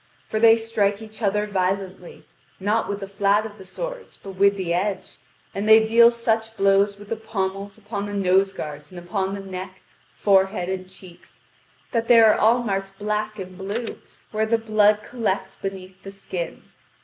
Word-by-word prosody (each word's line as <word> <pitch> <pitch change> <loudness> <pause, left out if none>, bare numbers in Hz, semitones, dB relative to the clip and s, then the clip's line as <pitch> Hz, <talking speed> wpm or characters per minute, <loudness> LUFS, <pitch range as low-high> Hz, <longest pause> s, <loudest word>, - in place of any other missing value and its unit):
For 215 - -2
they 225 0 +7
strike 215 -3 0
each 220 0 -11
other 210 0 +1
violently, 190 -2 -3 0.3
not 210 +4 0
with 200 0 -3
the 195 - -5
fiat 200 +1 +1
of 210 -1 -9
the 190 - -12
swords, - - -7
but 195 - -7
with 200 +1 +3
the 175 -3 -1
edge, 195 +3 -3 0.3
and 205 +2 -2
they 220 0 +8
deal 230 +1 +7
such 225 -1 -1
blows 200 +1 +3
with 205 0 -13
the 225 - -1
pommels 200 -2 -4
upon 205 -1 -5
the 205 - -6
nose 195 0 +3
guards 150 -5 -7
and 180 - -11
upon 190 +2 -2
the 200 - -6
neck, 185 -1 -8 0.3
forehead 190 -2 +2
and 185 -1 -4
cheeks, 185 -2 -16 0.5
that 230 -1 -1
they 240 -1 +7
are 220 -2 +7
all 235 +3 +3
marked 195 -2 -3
black 210 +1 -2
and 185 -1 -8
blue 205 +5 -4 0.3
where 220 0 0
the 230 +1 +2
blood 215 -1 +3
collects 205 -6 -3
beneath 190 -1 -7
the 195 - -9
skin. 185 -3 -6
200 Hz, 180 wpm, -23 LUFS, 190-220 Hz, 0.5 s, they